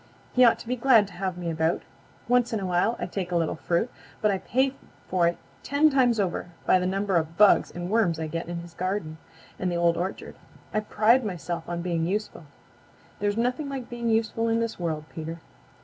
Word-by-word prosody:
"He 250 - +5
ought 235 - +6
to - - -11
be 250 - 0
glad 235 -4 +5
to - - -14
have 185 0 -3
me 175 -2 -3
about. 160 +1 0 0.4
Once 245 0 +3
in 220 - 0
a 195 - -3
while 180 +6 +1
I - - -3
take 185 -3 -4
a - - 0
little 165 -2 +1
fruit, 170 +7 0 0.3
but 210 - +2
I 195 - -1
pay 260 +6 +1 0.3
for 180 -2 +2
it 170 - 0 0.2
ten 295 +2 +3
times 245 -4 +3
over 180 -2 -1 0.2
by 185 - +5
the 180 - 0
number 195 0 +1
of 165 0 -2
bugs 210 -1 +6
and 175 0 -6
worms 185 -6 +2
I 160 - -2
get 165 +2 -4
in 170 0 -4
his 170 -1 -12
garden 180 -3 -3 0.4
and 185 -1 -1
the - - -1
Old 170 0 +3
Orchard. 185 +3 -4 0.4
I 215 - +2
pride 215 +4 +3
myself 175 -4 -4
on 170 0 -3
being 170 -2 0
useful. 205 -3 -3 0.7
There's 205 +1 0
nothing 250 +5 0
like 270 -3 -5
being 235 -1 -2
useful 225 0 +1
in 225 0 +2
this 230 -3 -2
world, 160 -3 -2
Peter." 165 +1 -6
190 Hz, 215 wpm, -26 LUFS, 170-230 Hz, 0.7 s, ought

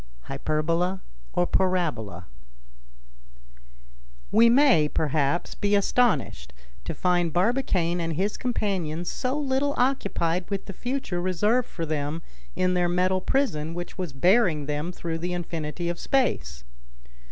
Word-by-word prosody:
HYPERBOLA 165 - -1 0.3
OR 175 - +2
PARABOLA 150 - 0 2.1
We 230 +2 +6
may, 245 - +5
perhaps, 150 +2 0
be 205 0 +1
astonished 200 - +1 0.3
to - - -4
find 175 -2 +1
Barbicane 180 - +1
and 165 -1 -2
his 195 +6 -1
companions 185 -9 -2
so 260 +2 -2
little 280 0 0
occupied 190 -9 0
with 200 -1 -3
the 195 - -7
future 245 -5 -3
reserved 210 +7 +1
for 165 - -4
them 155 +1 -3 0.3
in 185 0 +1
their 175 -1 +2
metal 185 +1 +1
prison 165 - 0
which 175 +2 -6
was 180 -5 -3
bearing 170 - +3
them 150 +4 -2
through 165 -2 -4
the 180 +2 -3
infinity 170 -1 -4
of 175 0 -3
space. 255 - 0
175 Hz, 125 wpm, -26 LUFS, 160-205 Hz, 2.1 s, We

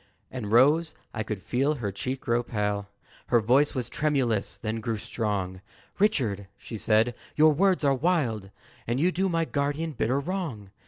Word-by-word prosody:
And 115 -5 -5
Rose 150 +8 +4 0.2
I 110 - -2
could 105 -3 -4
feel 140 +5 +1
her 110 -7 -3
cheek 130 +7 -4
grow 120 0 +1
pale 105 -3 -2 0.4
Her 120 - +4
voice 130 +8 +3
was 125 -3 -2
tremulous, 130 -8 0
then 110 0 -3
grew 110 0 -2
strong 100 -4 -3 0.4
"Richard," 120 - +1
she - - -8
said, 110 +3 +3 0.2
"your 155 0 +6
words 185 +2 +2
are 140 -1 +4
wild, 130 - 0 0.4
And 120 +3 0
you 175 +5 +3
do 190 +2 0
my 165 -1 +1
guardian 145 +2 -1
bitter 130 0 0
wrong. 140 - -4
125 Hz, 165 wpm, -27 LUFS, 110-150 Hz, 0.4 s, your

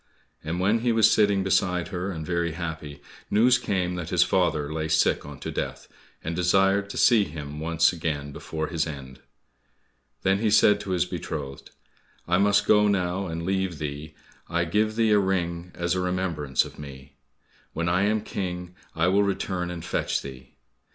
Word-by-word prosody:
And 80 +3 -3
when 105 +5 +2
he 120 +1 +1
was 110 -1 +5
sitting 100 -2 +3
beside 90 -2 +1
her 90 0 -3
and 80 -5 -5
very 85 -1 -1
happy, 80 -4 -6 0.3
news 120 +4 +4
came 90 -6 -1
that 85 -1 -5
his 90 -1 +4
father 80 -6 0
lay 80 -1 -2
sick 75 -2 +2
unto 75 -2 -7
death, - - -4 0.4
and 80 +2 -3
desired 95 +3 +2
to - - -6
see 115 -4 +5
him 75 -3 -7
once 85 +2 +2
again 75 -4 -3
before 80 +2 -4
his 85 -2 -1
end. 65 -3 -8 1.0
Then 95 0 +2
he 110 0 +1
said 105 0 +5
to 105 - -7
his 90 -1 +1
beloved, 75 -6 -6 0.6
"I 90 +2 +2
must 105 +1 +3
now 105 0 +5
go 95 -1 0
and 85 0 -4
leave 95 -2 -1
thee, 75 +1 -6 0.3
I 85 0 0
give 105 +5 0
thee 110 -1 +2
a 105 - +5
ring 90 -3 -1
as 85 0 -1
a 90 - -1
remembrance 90 -7 0
of - - -12
me. 70 -1 -11 0.6
When 85 +1 -2
I 90 +2 +2
am 105 +1 +1
King, 90 -3 -5 0.2
I 80 +1 +2
will 95 +3 +3
return 95 -3 -1
and 85 -2 -6
fetch - - -1
thee." 65 -2 -11
90 Hz, 180 wpm, -25 LUFS, 80-95 Hz, 1.0 s, was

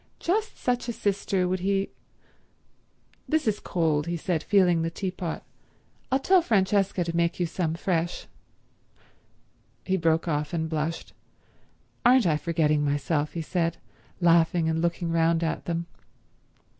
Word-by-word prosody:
Just 430 +5 -1
such 245 -1 -1
a - - -1
sister 195 -3 0
would 185 +1 -1
he— 195 +1 0 1.4
"This 315 -5 +1
is 210 -1 +1
cold," 160 -4 0
he 170 0 -1
said, 170 -1 -1
feeling 180 -4 +3
the 165 - -1
teapot. 180 -1 -4 0.7
"I'll 265 - +4
tell 365 +7 +4
Francesca 195 - +1
to 170 0 -4
make 170 +1 +1
you 175 - +2
some 165 -1 -2
fresh—" 175 -1 -1 1.6
He 190 0 +1
broke 165 0 +1
off 150 -1 -1
and 160 -1 -1
blushed. 160 +1 -3 0.9
"Aren't 250 -1 +5
I 155 -3 +3
forgetting 155 -2 +1
myself," 145 +1 0
he 165 - -3
said, 170 0 -1 0.4
laughing 170 -1 +3
and 160 0 0
looking 170 0 -1
round 165 0 +2
at 160 - -2
them. 170 0 -2
170 Hz, 140 wpm, -26 LUFS, 160-195 Hz, 1.6 s, Aren't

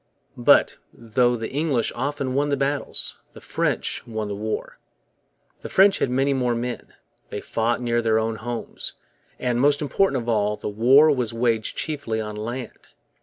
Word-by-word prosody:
But, - - +5
though 120 +2 +1
the 115 -1 -5
English 140 -5 0
often 135 0 -2
won 145 +2 +1
the 140 - +1
battles, 140 +1 -2
the - - -11
French - - -1
won 110 -2 -4
the 100 - -3
war. 110 +2 -4 0.8
The - - -7
French 195 +1 +5
had - - +1
many 135 +2 +2
more 125 -3 0
men, 120 +1 -5 0.3
they - - -4
fought 115 +2 -1
near 120 -1 +1
their 110 -1 +2
own 110 0 -1
homes, 120 +1 -5 0.4
and, 125 -1 0
most 145 +1 +4
important 150 0 +1
of - - -12
all, 105 -2 +1
the - - -4
war 130 +9 +6
was 125 -5 -1
waged 115 -2 0
chiefly 140 -8 -2
on 105 -1 -4
land. 120 +3 -6
120 Hz, 170 wpm, -23 LUFS, 110-140 Hz, 0.8 s, war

